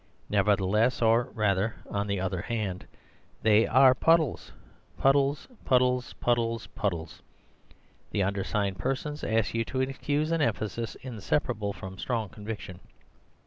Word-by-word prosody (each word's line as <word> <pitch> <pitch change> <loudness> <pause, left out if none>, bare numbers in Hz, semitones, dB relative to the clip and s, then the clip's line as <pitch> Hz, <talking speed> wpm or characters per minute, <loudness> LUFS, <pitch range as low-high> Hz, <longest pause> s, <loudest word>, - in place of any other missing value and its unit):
Nevertheless, 105 +3 +2
or, 115 +1 +4
rather, 105 0 +1
on 100 0 -2
the 100 -1 -1
other 95 -1 -2
hand, 100 -4 -3 0.6
they 110 0 +5
are 130 +1 +6
puddles—puddles, 140 -1 0 0.2
puddles, 125 0 +2
puddles, 115 -1 0
puddles. 85 -6 -3 0.9
The 100 - 0
undersigned 100 0 -1
persons 135 +6 -3
ask 110 -1 0
you 115 0 +1
to 130 +2 -2
excuse 145 +4 -1
an 165 -1 +1
emphasis 115 -2 -2
inseparable 115 -2 -2
from 95 -1 -9
strong 115 -5 -2
conviction." 105 -4 -7
110 Hz, 115 wpm, -28 LUFS, 100-130 Hz, 0.9 s, are